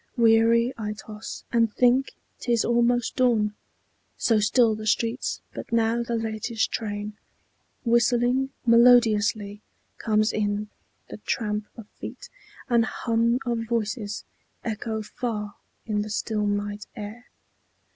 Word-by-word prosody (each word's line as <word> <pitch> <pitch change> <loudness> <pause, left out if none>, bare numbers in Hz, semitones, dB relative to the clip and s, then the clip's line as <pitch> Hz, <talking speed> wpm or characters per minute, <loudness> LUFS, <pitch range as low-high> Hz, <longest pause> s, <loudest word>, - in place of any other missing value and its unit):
Weary 230 +1 +4
I 210 -1 -2
toss, 210 0 -8
and 230 -2 +3
think 250 +4 +3 0.3
't 240 - -3
is 235 -2 +3
almost 240 0 +2
dawn, 225 -5 +3 0.6
So 225 -3 +3
still 220 +2 +4
the 215 0 -5
streets; 230 +3 0
but - - -8
now 230 0 +2
the 235 0 -2
latest 225 0 -2
train, 210 -1 -3 0.7
Whistling 245 +2 +3 0.2
melodiously, 220 -4 +4 0.4
comes 215 -1 +2
in; 210 0 -1 0.4
the - - -6
tramp 210 -1 -2
Of 225 -3 -10
feet, - - -8 0.4
and 235 -2 +4
hum 230 +1 +1
of 235 -2 -1
voices, 215 -2 -2 0.4
echo 220 -1 -3
far 210 -2 -4 0.3
In 210 -2 0
the 210 - -5
still 210 0 -1
night 205 0 -2
air. 215 +3 -8
225 Hz, 125 wpm, -25 LUFS, 210-235 Hz, 0.7 s, Weary